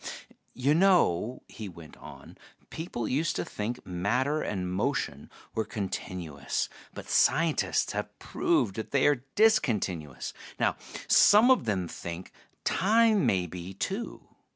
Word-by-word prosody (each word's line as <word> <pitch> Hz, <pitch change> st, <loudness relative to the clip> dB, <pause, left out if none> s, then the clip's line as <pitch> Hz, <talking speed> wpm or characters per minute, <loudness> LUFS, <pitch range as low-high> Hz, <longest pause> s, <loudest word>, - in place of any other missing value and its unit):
"You 135 Hz, +4 st, +2 dB
know," 155 Hz, -, +3 dB
he 105 Hz, -3 st, -8 dB
went 85 Hz, -3 st, -13 dB
on, -, -, -12 dB, 0.4 s
"people 160 Hz, -9 st, -4 dB
used 155 Hz, +5 st, 0 dB
to -, -, -2 dB
think 115 Hz, +4 st, -5 dB
matter 125 Hz, +12 st, 0 dB
and 90 Hz, -3 st, -3 dB
motion 95 Hz, -, -2 dB, 0.2 s
were 110 Hz, 0 st, 0 dB
continuous, 95 Hz, -8 st, -4 dB, 0.2 s
but -, -, -9 dB
scientists 160 Hz, +3 st, +2 dB
have -, -, -5 dB
proved 95 Hz, -, 0 dB
that 110 Hz, -, -4 dB
they 140 Hz, -2 st, +2 dB
are 145 Hz, -4 st, +3 dB
discontinuous. 105 Hz, -, +1 dB, 0.3 s
Now -, -, +2 dB, 0.3 s
some 220 Hz, +5 st, +7 dB
of 255 Hz, -, +3 dB
them 95 Hz, -5 st, -1 dB
think 85 Hz, +2 st, -7 dB, 0.3 s
time 215 Hz, +2 st, +3 dB
may 90 Hz, -2 st, +2 dB
be, 90 Hz, +2 st, -8 dB
too. 195 Hz, -, -4 dB
110 Hz, 130 wpm, -28 LUFS, -, 0.4 s, some